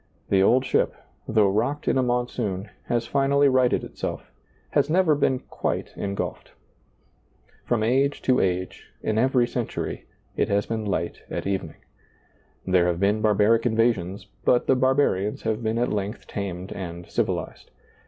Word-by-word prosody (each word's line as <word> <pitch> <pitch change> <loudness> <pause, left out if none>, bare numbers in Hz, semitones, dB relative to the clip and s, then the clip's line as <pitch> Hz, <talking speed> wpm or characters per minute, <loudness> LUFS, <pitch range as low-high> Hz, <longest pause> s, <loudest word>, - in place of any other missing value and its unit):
The 95 -1 +4
old 125 +7 +4
ship, - - +1 0.3
though 105 -3 +3
rocked 125 +8 -1
in - - +3
a 130 - +3
monsoon, 120 -5 -2
has 120 -1 0
finally 140 +3 +3
righted 130 -2 +3
itself, - - -6 0.4
has - - +2
never 175 -1 +4
been 140 -2 +2
quite - - -4
engulfed. 100 0 -4 1.1
From 115 -3 +1
age 135 +5 +2
to 130 -1 +3
age, 90 0 -2 0.2
in 110 0 0
every 125 0 +3
century, 120 -2 -4 0.3
it - - 0
has 100 0 +1
been 110 -1 -3
light 85 -4 -2
at - - -4
evening. 95 -5 -3 0.9
There 90 -2 +3
have 85 -1 0
been 100 +2 +2
barbaric 110 +2 +3
invasions, 110 -5 0 0.2
but 125 - +3
the 135 - +4
barbarians 130 -6 +1
have 110 0 -1
been 110 0 -1
at 120 -1 0
length 105 +2 -3
tamed 95 -2 -5
and 85 -2 -6
civilized. - - -3
110 Hz, 150 wpm, -25 LUFS, 100-125 Hz, 1.1 s, The